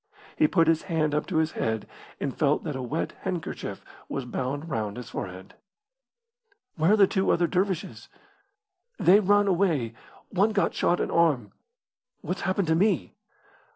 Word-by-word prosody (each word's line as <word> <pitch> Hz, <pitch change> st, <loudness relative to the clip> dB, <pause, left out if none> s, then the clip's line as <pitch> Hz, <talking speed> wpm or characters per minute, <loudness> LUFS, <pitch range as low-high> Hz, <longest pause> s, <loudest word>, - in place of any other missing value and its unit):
He 310 Hz, -, +4 dB
put 165 Hz, -, +3 dB
his 160 Hz, -1 st, +3 dB
hand 155 Hz, -3 st, +1 dB
up 150 Hz, -, -1 dB
to 180 Hz, -, -1 dB
his 160 Hz, 0 st, +2 dB
head 110 Hz, -1 st, -2 dB, 0.3 s
and 135 Hz, -, -3 dB
felt 145 Hz, -1 st, +1 dB
that 150 Hz, -4 st, -4 dB
a 130 Hz, -, -4 dB
wet 140 Hz, +6 st, -2 dB
handkerchief 180 Hz, -4 st, -5 dB, 0.2 s
was 135 Hz, -, -3 dB
bound 135 Hz, +5 st, -3 dB
round 110 Hz, -8 st, -3 dB
his 125 Hz, -2 st, -8 dB
forehead. 95 Hz, 0 st, -7 dB, 1.2 s
"Where 165 Hz, +5 st, +3 dB
are -, -, +4 dB
the 200 Hz, -, +7 dB
two 190 Hz, 0 st, 0 dB
other 175 Hz, -, +3 dB
dervishes?" 180 Hz, -, -2 dB, 0.9 s
"They 195 Hz, +4 st, +6 dB
ran 205 Hz, 0 st, +4 dB
away. 170 Hz, -, +1 dB, 0.4 s
One 205 Hz, +3 st, +2 dB
got 200 Hz, -, +1 dB
shot 175 Hz, -, +1 dB
in -, -, -1 dB
arm." 150 Hz, -11 st, +2 dB, 0.7 s
"What's 180 Hz, +2 st, -4 dB
happened 185 Hz, -1 st, 0 dB
to 160 Hz, -, +4 dB
me?" 180 Hz, -, +1 dB
160 Hz, 160 wpm, -26 LUFS, 135-190 Hz, 1.2 s, the